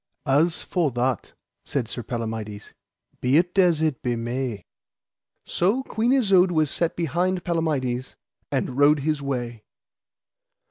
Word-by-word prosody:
As 155 +5 +2
for 175 -5 0
that, 125 +1 -1 0.3
said 130 -5 -2
Sir 120 - -5
Palamides, 110 -3 -5 0.5
be 130 +3 +3
it 175 +2 +1
as 170 -4 +4
it 155 -5 0
be 120 -1 -1
may. 120 -3 -3 0.8
So 205 +10 +1
Queen 230 0 0
Isoud 195 -9 +4
was 155 -4 +1
set 170 -1 0
behind 175 +3 0
Palamides, 140 -7 -1 0.4
and 130 +2 -1
rode 145 0 +5
his 150 0 -1
way. 120 -5 -3
145 Hz, 130 wpm, -24 LUFS, 125-175 Hz, 0.8 s, rode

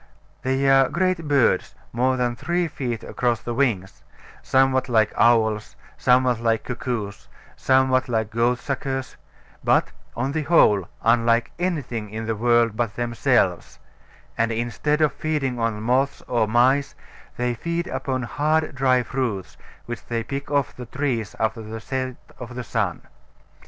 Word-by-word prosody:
They 135 +1 0
are 135 -1 +5
great 180 0 0
birds, 135 -10 +2 0.2
more 130 +2 +1
than 120 -1 0
three 175 +7 -1
feet 125 -7 -4
across 120 -2 -1
the 120 - -4
wings, 115 -8 -1 0.4
somewhat 130 -1 +2
like 110 -3 +3
owls, 110 -3 +2 0.2
somewhat 125 -1 +3
like 115 -1 +1
cuckoos, 115 -5 -4 0.3
somewhat 130 0 +2
like 110 -2 -1
goatsuckers; 130 +3 -1 0.5
but, - - +2 0.3
on 130 +3 -1
the 155 +2 -1
whole, 105 - +4 0.2
unlike 115 0 +3
anything 130 - -2
in 110 +2 -5
the 115 0 -1
world 120 0 +3
but 115 -2 -2
themselves; 120 -1 0 0.6
and 115 0 +2
instead 120 +7 -1
of 155 - +3
feeding 140 -6 -2
on 115 -2 -1
moths 130 +4 +1
or 115 -3 +1
mice, 130 +5 +2 0.4
they 125 0 0
feed 170 +8 -3
upon 130 -1 -3
hard 150 +8 0
dry 130 -2 +2
fruits, 120 -8 -3 0.3
which 120 0 -6
they 115 -1 -2
pick 140 +4 -5
off 140 -3 0
the 125 -2 -8
trees 125 -6 -2
after 110 +1 -1
the 110 +1 -7
set 130 +1 -3 0.2
of 125 0 -7
sun. 100 -7 -2
125 Hz, 140 wpm, -23 LUFS, 115-135 Hz, 0.6 s, are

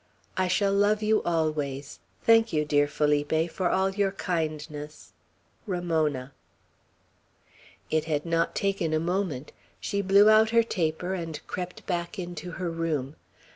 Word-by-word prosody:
I 185 0 +1
shall 195 +2 +2
love 205 +2 +2
you 215 0 +3
always. 150 - -2 0.2
Thank 225 0 +5
you, 150 -1 +1
dear 145 -1 +3
Felipe, 150 +2 +1
for 185 -2 0
all 190 +1 +2
your 195 0 +1
kindness. 155 -4 -4 0.5
"RAMONA." 160 -8 -1 1.6
It 155 0 +1
had 150 -1 -1
not 165 0 0
taken 195 -5 0
a - - +2
moment. 170 -5 -2 0.3
She 200 - -1
blew 200 +2 +6
out 215 0 +6
her 230 0 +4
taper, 175 -3 -1
and 165 -4 -4
crept 180 0 -6
back 175 +1 -3
into 175 -2 -6
her 175 -1 -3
room. 155 -4 -2
170 Hz, 135 wpm, -27 LUFS, 155-195 Hz, 1.6 s, blew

